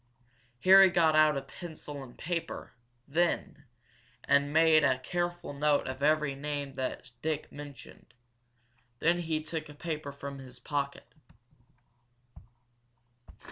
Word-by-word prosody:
Harry 190 Hz, 0 st, +9 dB
got 165 Hz, -3 st, +3 dB
out 155 Hz, -2 st, +5 dB
a 135 Hz, -, -3 dB
pencil 150 Hz, -2 st, -9 dB
and 125 Hz, -2 st, -12 dB
paper 170 Hz, 0 st, -4 dB, 0.3 s
then, 150 Hz, -1 st, 0 dB, 0.6 s
and 145 Hz, 0 st, +3 dB
made 160 Hz, 0 st, +5 dB
a 130 Hz, -2 st, +3 dB
careful 175 Hz, +4 st, -3 dB
note 145 Hz, 0 st, +2 dB
of 130 Hz, +1 st, -5 dB
every 150 Hz, -1 st, +2 dB
name 140 Hz, 0 st, -4 dB
that 130 Hz, 0 st, -4 dB
Dick 155 Hz, -1 st, -2 dB
mentioned. 145 Hz, -3 st, -11 dB, 0.8 s
Then 170 Hz, +7 st, +2 dB
he 160 Hz, -2 st, -2 dB
took 155 Hz, 0 st, -5 dB
a 150 Hz, -, -11 dB
paper 155 Hz, -2 st, -4 dB
from 140 Hz, 0 st, -8 dB
his 130 Hz, -2 st, -10 dB
pocket. 140 Hz, +2 st, -3 dB
150 Hz, 120 wpm, -30 LUFS, 140-160 Hz, 0.8 s, Harry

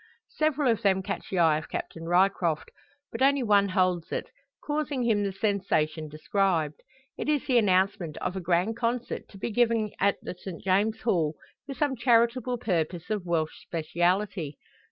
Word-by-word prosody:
Several 305 Hz, -2 st, +1 dB
of 225 Hz, -, -1 dB
them 190 Hz, -1 st, +2 dB
catch 195 Hz, +1 st, -5 dB
the 190 Hz, -, -2 dB
eye 160 Hz, -3 st, +4 dB
of 155 Hz, -, -11 dB
Captain 165 Hz, 0 st, -5 dB
Ryecroft, 175 Hz, -3 st, +2 dB, 0.4 s
but -, -, -6 dB
only 275 Hz, 0 st, +4 dB
one 200 Hz, -3 st, +4 dB
holds 185 Hz, -3 st, +1 dB
it, -, -, -3 dB, 0.3 s
causing 295 Hz, -3 st, -1 dB
him 220 Hz, -3 st, +2 dB
the 200 Hz, -1 st, -1 dB
sensation 185 Hz, -6 st, 0 dB
described. 160 Hz, 0 st, 0 dB, 0.4 s
It -, -, -2 dB
is 295 Hz, -3 st, +1 dB
the 250 Hz, -2 st, +4 dB
announcement 185 Hz, -5 st, +1 dB
of 185 Hz, -, -3 dB
a -, -, -2 dB
grand 180 Hz, +5 st, +1 dB
concert 240 Hz, +1 st, -2 dB
to 200 Hz, -, -13 dB
be 215 Hz, -, -3 dB
given 230 Hz, -2 st, +2 dB
at 200 Hz, 0 st, +3 dB
the -, -, -5 dB
St. 180 Hz, -1 st, -9 dB
James's 205 Hz, +4 st, +1 dB
Hall, 165 Hz, -9 st, +1 dB, 0.3 s
for 275 Hz, -, -5 dB
some 290 Hz, -2 st, 0 dB
charitable 240 Hz, +1 st, +2 dB
purpose 175 Hz, -3 st, -2 dB
of 205 Hz, -4 st, -2 dB
Welsh 160 Hz, -2 st, -1 dB
speciality. 175 Hz, 0 st, -1 dB
195 Hz, 170 wpm, -27 LUFS, 170-230 Hz, 0.4 s, eye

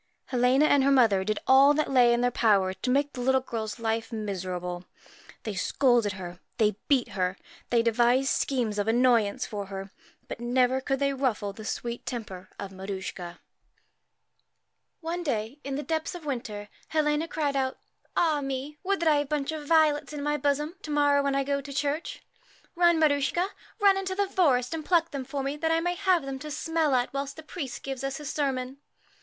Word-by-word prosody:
Helena 255 Hz, +3 st, +3 dB
and 285 Hz, -2 st, +4 dB
her 275 Hz, -, +4 dB
mother 230 Hz, -8 st, +4 dB
did 215 Hz, +1 st, -1 dB
all 275 Hz, +3 st, +6 dB
that 305 Hz, -2 st, 0 dB
lay 245 Hz, -2 st, +5 dB
in 235 Hz, 0 st, +2 dB
their 245 Hz, 0 st, +2 dB
power 200 Hz, -6 st, +3 dB
to 190 Hz, +7 st, -4 dB
make 285 Hz, +3 st, +1 dB
the 250 Hz, -, -5 dB
little 265 Hz, +1 st, +3 dB
girl's 225 Hz, -4 st, -5 dB
life 225 Hz, 0 st, -2 dB
miserable. 180 Hz, -4 st, -4 dB, 0.6 s
They 215 Hz, -, -3 dB
scolded 235 Hz, +1 st, +2 dB
her, 180 Hz, -2 st, -8 dB, 0.2 s
they 215 Hz, -3 st, +2 dB
beat 270 Hz, -4 st, +2 dB
her, 185 Hz, 0 st, -1 dB, 0.3 s
they 235 Hz, -1 st, +3 dB
devised 240 Hz, +3 st, +3 dB
schemes 235 Hz, -6 st, 0 dB
of 205 Hz, -, -1 dB
annoyance 230 Hz, -3 st, +3 dB
for 205 Hz, -2 st, -5 dB
her, 195 Hz, 0 st, -7 dB, 0.4 s
but -, -, -6 dB
never 250 Hz, +2 st, +2 dB
could 270 Hz, 0 st, -1 dB
they 275 Hz, 0 st, +1 dB
ruffle 230 Hz, -7 st, -1 dB
the 215 Hz, +1 st, -10 dB
sweet 235 Hz, +1 st, -4 dB
temper 190 Hz, -6 st, -6 dB
of 195 Hz, -, -6 dB
Maruschka. 190 Hz, -2 st, -6 dB, 1.6 s
One 340 Hz, +2 st, -3 dB
day, 250 Hz, -3 st, -3 dB
in 275 Hz, 0 st, -4 dB
the 290 Hz, -, -3 dB
depth 320 Hz, +2 st, -2 dB
of 340 Hz, -3 st, -9 dB
winter, 220 Hz, -7 st, -4 dB, 0.2 s
Helena 305 Hz, 0 st, +1 dB
cried 295 Hz, -4 st, -1 dB
out, 265 Hz, -1 st, -1 dB, 0.4 s
'Ah, 310 Hz, -4 st, +2 dB
mel 270 Hz, +1 st, -3 dB
would 395 Hz, 0 st, 0 dB
that 335 Hz, -, +1 dB
I 300 Hz, -2 st, +5 dB
had 290 Hz, -, 0 dB
a -, -, -20 dB
bunch 295 Hz, -1 st, -1 dB
of 305 Hz, -2 st, -6 dB
violets 305 Hz, -2 st, +3 dB
in 290 Hz, -1 st, -4 dB
my 295 Hz, 0 st, +1 dB
bosom 295 Hz, +4 st, -1 dB
to -, -, -9 dB
morrow, 290 Hz, -1 st, +3 dB
when 280 Hz, -1 st, 0 dB
I 275 Hz, -, +2 dB
go 280 Hz, 0 st, -1 dB
to 280 Hz, +1 st, -9 dB
church. 285 Hz, +3 st, -2 dB, 0.5 s
Run, 345 Hz, -1 st, +4 dB
Maruschka, 310 Hz, +4 st, +2 dB, 0.3 s
run 400 Hz, -2 st, +5 dB
into 380 Hz, -1 st, -3 dB
the 400 Hz, 0 st, +1 dB
forest 275 Hz, -9 st, +2 dB
and 320 Hz, -1 st, -4 dB
pluck 330 Hz, 0 st, +2 dB
them 275 Hz, -2 st, -4 dB
for 275 Hz, +1 st, -3 dB
me, 275 Hz, +2 st, -2 dB
that 320 Hz, +2 st, 0 dB
I 325 Hz, 0 st, +3 dB
may 350 Hz, +1 st, 0 dB
have 355 Hz, -2 st, +2 dB
them 270 Hz, -1 st, -5 dB
to 305 Hz, -, -7 dB
smell 320 Hz, -1 st, 0 dB
at 245 Hz, +1 st, 0 dB
whilst 275 Hz, 0 st, -3 dB
the 315 Hz, -, -10 dB
priest 300 Hz, -4 st, -6 dB
gives 270 Hz, -1 st, -5 dB
us 275 Hz, 0 st, -2 dB
his 295 Hz, -2 st, -5 dB
sermon.' 265 Hz, -2 st, -2 dB
270 Hz, 200 wpm, -27 LUFS, 225-295 Hz, 1.6 s, all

